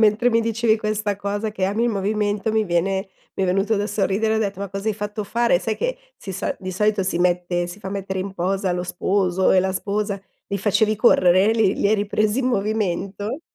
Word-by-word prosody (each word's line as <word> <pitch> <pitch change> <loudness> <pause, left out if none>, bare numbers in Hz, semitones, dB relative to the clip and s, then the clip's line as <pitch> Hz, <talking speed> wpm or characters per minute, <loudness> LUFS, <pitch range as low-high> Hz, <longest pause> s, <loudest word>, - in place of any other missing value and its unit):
mentre 220 +3 +4
mi 230 0 +3
dicevi 225 0 +1
questa 215 -1 -1
cosa, 205 +2 -3
che 195 -3 -2
ami 205 +5 0
il - - +2
movimento, 210 +1 -1
mi 220 -1 +2
viene 190 +2 0 0.3
mi 195 - 0
è - - +2
venuto 195 +4 +1
da 205 +1 0
sorridere, 210 +1 0
ho - - +1
detto: 200 -3 -2
"Ma 200 - -3
cosa 195 +2 -6
hai 215 - 0
fatto 210 +1 -4
fare?" 235 -2 +2
Sai 210 +4 -2
che - - -2 0.2
si 195 - -8
so 190 - -2
di 185 - -5
solito 205 +2 +1
si 185 -2 -1
mette 175 0 +1
si 175 +4 -9
fa 195 - -6
mettere 195 -1 -4
in 195 +1 -5
posa 190 +1 -1
lo 180 0 -2
sposo 185 0 +1
e 190 - +5
la 190 +1 0
sposa, 200 +1 -2 0.3
li 200 - -3
facevi 210 +2 +2
correre? 190 -2 +5
Li 220 -4 +2
li 200 - +1
hai 215 - +4
ripresi 210 +2 0
in 260 - 0
movimento? 205 - -1
200 Hz, 220 wpm, -22 LUFS, 190-215 Hz, 0.3 s, e